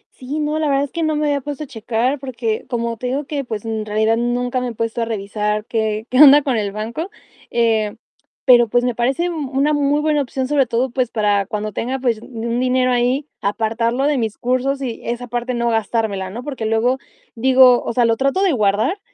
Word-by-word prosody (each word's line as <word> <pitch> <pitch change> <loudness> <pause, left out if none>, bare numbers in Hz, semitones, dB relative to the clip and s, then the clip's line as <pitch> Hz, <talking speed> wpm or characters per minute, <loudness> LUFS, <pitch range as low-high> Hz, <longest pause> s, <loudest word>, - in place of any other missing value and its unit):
Sí, 270 +4 -5
no, 300 +1 -1
la 310 - 0
verdad 275 0 +2
es 285 - -5
que 335 - -3
no 310 -1 +1
me 300 0 0
había 285 -1 0
puesto 290 +2 -5
a - - -9
checar, 245 +3 -1
porque 235 -4 -3
como 235 -1 -2
te 250 - -4
digo 275 +4 -2
que, 285 -1 -3
pues, 220 -3 -6
en 220 -1 -2
realidad 215 +1 +1
nunca 245 +2 -1
me 250 - -2
he 240 - -5
puesto 230 +1 -2
a - - +1
revisar 210 -1 -2
qué 220 -2 -1
qué 255 - +2
onda 290 0 +9
con 265 -3 0
el 205 -3 -1
banco. 230 - -4 0.4
Eh, 220 -2 +1 0.5
pero, 240 -2 +6
pues, 245 +2 +1
me 245 -1 0
parece 270 +9 0
una 290 -2 0
muy 290 0 +1
buena 300 -1 +1
opción, 260 -1 -3
sobre 275 -2 +2
todo, 240 +3 0
pues, 250 -1 0
para 205 -3 +1
cuando 210 +1 -3
tenga, 250 +6 -3
pues, 240 -4 -1
un 235 0 -4
dinero 255 0 +2
ahí, 250 +3 +1 0.2
apartarlo 230 +5 0
de 290 -3 +1
mis 220 -2 -2
cursos 260 +3 -1
y 240 -3 -4
esa 240 +1 -3
parte 240 +1 -3
no 235 0 0
gastármela, 220 -3 -1
¿no? 230 +6 -7
Porque 265 -6 -4
luego 235 +4 +1 0.3
digo, 255 0 +5
o - - -3
sea, 240 0 +3
lo 230 0 +3
trato 275 - +1
de 385 - +3
guardar 215 - +1
245 Hz, 220 wpm, -19 LUFS, 225-270 Hz, 0.5 s, onda